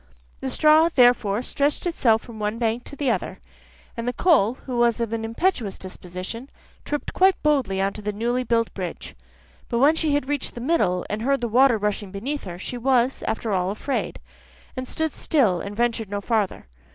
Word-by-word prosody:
The - - -3
straw 310 - +5
therefore 245 -6 +3
stretched 285 +5 0
itself 235 -10 +2
from 230 -3 -11
one 210 +1 -2
bank 230 +1 -1
to - - -8
the 280 -3 0
other, - - -3 0.6
and 230 +1 -4
the 245 - 0
coal, 255 - +3
who 255 -2 -3
was 240 0 +3
of 230 -1 -2
an 225 -1 -2
impetuous 230 - -1
disposition, 185 +7 -7 0.3
tripped 295 0 -4
quite 380 +1 +4
boldly 265 -11 +1
on 195 +1 0
to 210 - -7
the 210 0 -2
newly 240 +4 -1
built 230 -1 0
bridge. 175 - -6 0.6
But 235 - 0
when 285 +6 +5
she 315 -3 +1
had 290 -2 -1
reached 290 -2 -2
the - - -6
middle, 235 - +1
and 210 +1 -3
heard 275 +3 +1
the 240 - 0
water 245 +1 +4
rushing 205 -1 -2
beneath 245 +9 -4
her, 175 -2 -6
she 245 +6 -5
was 255 0 +2
after 220 0 -2
all, 185 -1 +1
afraid, 215 +7 -3 0.6
and 255 -1 -5
stood 320 +1 -2
still, 220 - +2
and 200 +1 -6
ventured 230 -2 0
no 205 0 -2
farther. 210 - -1
235 Hz, 195 wpm, -24 LUFS, 210-275 Hz, 0.6 s, straw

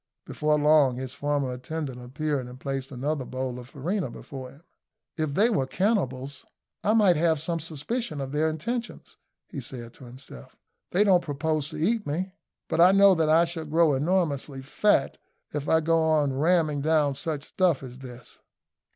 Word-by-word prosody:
Before 150 0 0
long 150 -3 +4
his 130 0 -5
former 140 -1 -1
attendant 135 -1 -5
appeared 135 +1 -3
and 125 +1 -11
placed 135 0 -4
another 140 +2 -2
bowl 130 -1 -4
of 125 0 -11
farina 175 +9 -2
before 130 -2 -9
him. 145 +5 -18 0.5
"If 155 -3 -2
they 215 +4 +4
were 135 -11 0
cannibals, 140 - -1 0.4
I 215 - +3
might 200 -7 +5
have 160 -1 +2
some 165 +2 -2
suspicions 160 - -4
of 135 -1 -4
their 150 +2 +1
intentions," 230 +10 -5 0.3
he - - -7
said 120 -2 -9
to 130 - -14
himself; 120 - -13 0.3
"they 190 +4 +3
don't 190 -4 +4
propose 150 0 -1
to 155 - -7
eat 205 +7 0
me; 180 +6 -3 0.3
but 165 - +1
I 180 +2 +7
know 200 0 +7
that 160 -3 +1
I 165 +2 +5
shall 165 -1 -5
grow 160 0 +3
enormously 145 -3 -1
fat 150 +2 +1 0.3
if 145 -1 -3
I 160 - +4
go 165 +1 +2
on 155 -3 +2
long 130 - -4
ramming 155 -3 +2
down 150 -2 +2
such 145 +1 -4
stuff 175 -7 +1
as 125 0 -9
this." 125 -2 -11
150 Hz, 175 wpm, -26 LUFS, 135-170 Hz, 0.5 s, I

